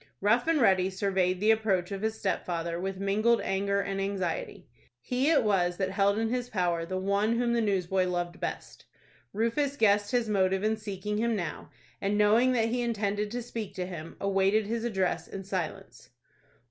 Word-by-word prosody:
Rough 230 +7 +2
and 330 -2 +3
Ready 190 -5 +4
surveyed 190 -1 0
the 215 +3 +4
approach 205 -5 +1
of 195 -1 -4
his 220 0 -1
stepfather 170 -4 -2
with 190 +1 -3
mingled 215 +4 +2
anger 200 +1 0
and 195 0 -3
anxiety. 195 -3 -3 0.3
He 250 - 0
it 320 -6 +4
was 180 -4 +1
that 190 -1 -1
held 200 +1 +2
in 225 0 0
his 245 0 -2
power 175 -5 -1
the 185 +1 -3
one 200 +4 +1
whom 240 0 +1
the 235 - +2
newsboy 190 -3 +1
loved 175 0 -3
best. - - -6 0.5
Rufus 250 +7 0
guessed 205 -3 +3
his 240 -1 +1
motive 190 -2 +1
in 215 +1 +2
seeking 210 0 -4
him 230 0 +1
now, 170 -6 -5 0.3
and, 205 +1 0
knowing 225 +5 +4
that 225 -2 +1
he 245 +1 -1
intended 210 -3 -1
to 240 +2 -4
speak 225 -4 -6
to 180 - -3
him, 165 -3 -8
awaited 195 +2 +2
his 230 +2 -2
address 190 -6 -1
in 195 - -7
silence. 185 -4 -5
200 Hz, 185 wpm, -29 LUFS, 190-225 Hz, 0.5 s, Ready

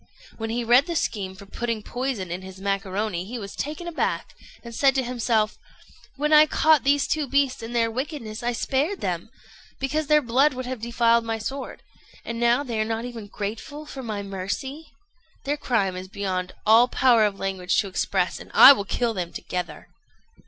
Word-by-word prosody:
When 225 0 -4
he 235 +2 -1
read 245 +6 +5
the 340 - -3
scheme 195 -10 -2
for 200 +1 -12
putting 230 +1 -3
poison 245 -9 -3
in 180 +2 -4
his 190 0 -11
macaroni, 195 -1 -2
he 235 +6 -6
was 200 -3 -7
taken 310 +4 -5
aback, 340 - -2 0.3
and 235 -1 -9
said 270 +3 +3
to 265 - +1
himself, 230 -3 0 0.6
"When 300 +2 0
I 305 0 +8
caught 310 -3 +4
those 285 +1 +3
two 305 -2 -1
beasts 275 -1 +1
in 225 +1 -7
their 230 -1 +1
wickedness 250 -3 -5
I 240 0 0
spared 280 - -1
them, - - -3 0.5
because 295 +3 -1
their 300 0 +4
blood 260 +4 +3
would 255 0 -5
have 250 -2 -5
defiled 235 0 +2
my 225 0 -2
sword; 265 +5 -6 0.4
and 230 0 -4
now 240 +3 +3
they 235 -5 -3
are - - +3
not 225 +1 -3
even 235 -4 -7
grateful 225 +9 -6
for 275 -2 -8
my 215 -4 -4
mercy. 200 +11 -5 0.6
Their 285 +1 0
crime 215 -10 0
is 185 +1 -6
beyond 185 -2 -3
all 225 +3 +6
power 245 -3 +4
of 205 -2 0
language 190 -2 -1
to 205 - -6
express, 185 -1 -1
and - - -12
I 280 - +11
will 200 -7 -4
kill 235 +3 -1
them 180 -4 -4
together." 175 -4 -5
235 Hz, 190 wpm, -24 LUFS, 200-270 Hz, 0.6 s, I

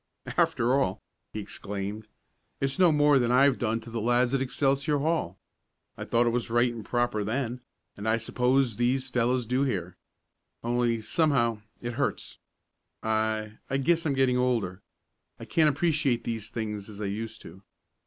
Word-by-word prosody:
"After 120 +2 +2
all!" - - -1 0.3
he 110 - -5
exclaimed, 100 +1 -5 0.5
"it's 135 +3 -2
no 180 -3 +6
more 145 -2 +4
than 120 -1 +1
I've 135 +1 +4
done 115 -1 0
to 115 +1 -11
the 115 -1 -3
lads 120 +2 +2
at 135 - +1
Excelsior 140 +2 +1
Hall. 140 - -1 0.6
I - - -6
thought 120 +1 +3
it 120 - +2
was 120 -1 -2
right 120 +1 +2
and 115 -2 -7
proper 120 -3 0
then, 125 +3 -2 0.3
and 105 +2 -6
I 110 +1 +3
suppose 125 +1 +1
these 130 +2 +1
fellows 125 0 +1
do 125 +4 0
here. 90 -10 -2 0.7
Only, 120 -1 +1
somehow, 120 -3 +1 0.2
it 120 0 -4
hurts. - - -3 0.6
I 110 -1 -1
I 135 - +1
guess 165 +5 +2
I'm 145 - +1
getting 130 -2 +3
older. 115 -7 0 0.6
I - - -8
can't 155 -2 +3
appreciate 145 -5 +1
these 110 -1 -4
things 105 -3 -4
as 105 -1 -10
I 105 - -3
used 110 +2 -4
to. 95 - -12
120 Hz, 165 wpm, -28 LUFS, 110-135 Hz, 0.7 s, no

